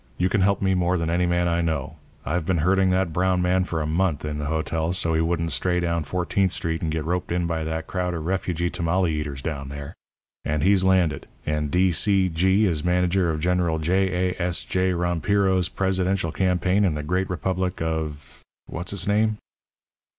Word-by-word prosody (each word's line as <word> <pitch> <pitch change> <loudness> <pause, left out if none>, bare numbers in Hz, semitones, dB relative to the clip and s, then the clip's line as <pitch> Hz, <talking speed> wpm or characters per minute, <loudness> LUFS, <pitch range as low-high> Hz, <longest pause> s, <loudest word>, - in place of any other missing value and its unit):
You 90 +1 +1
can 105 - +1
help 100 +1 +2
me 95 0 +2
more 90 0 +1
than 85 -1 -1
any 90 +1 +1
man 85 0 +1
I 85 0 +1
know. 80 -5 -2 0.3
I've 85 +2 -1
been 90 +2 0
herding 95 0 +3
that 90 -3 +1
brown 90 +1 +1
man 90 +1 +2
for 80 -2 -3
a - - -1
month 80 -1 0
in 75 0 -3
the 75 - -3
hotel 80 +2 -1
so 85 -3 0
he 80 - +2
wouldn't 85 0 -1
stray 90 +7 +1
down 85 -2 -1
Fourteenth 90 +4 0
Street 80 -2 -1
and 80 - -1
get 80 -1 -2
roped 90 +1 -2
in 90 0 0
by 80 -1 -2
that 80 0 -3
crowd 90 -2 -2
of 80 -2 -5
refugee 90 -2 -1
tamale 90 0 0
eaters 75 -3 -4
down 70 -4 -4
there. 70 0 -7 0.5
And 75 0 -1
he's 95 0 +4
landed, 90 -7 +2 0.2
and 75 -1 -1
D. 90 +3 +3
C. 95 +2 +2
G. 95 +5 +2
is 80 -6 0
manager 90 0 +2
of 80 -1 -2
General 90 -1 +1
J. 90 +2 +1
A. - - -8
S. 90 0 -1
J. 95 0 0
Rompiro's 90 +2 +1
presidential 95 -2 0
campaign 95 +2 +1
in 90 -6 +1
the 75 - -4
great 90 +5 -1
republic 90 +1 -2
of 80 -2 -4 0.2
what's 85 +4 -5
its 95 -1 -2
name?' 105 +1 +2
90 Hz, 200 wpm, -24 LUFS, 80-95 Hz, 0.5 s, he's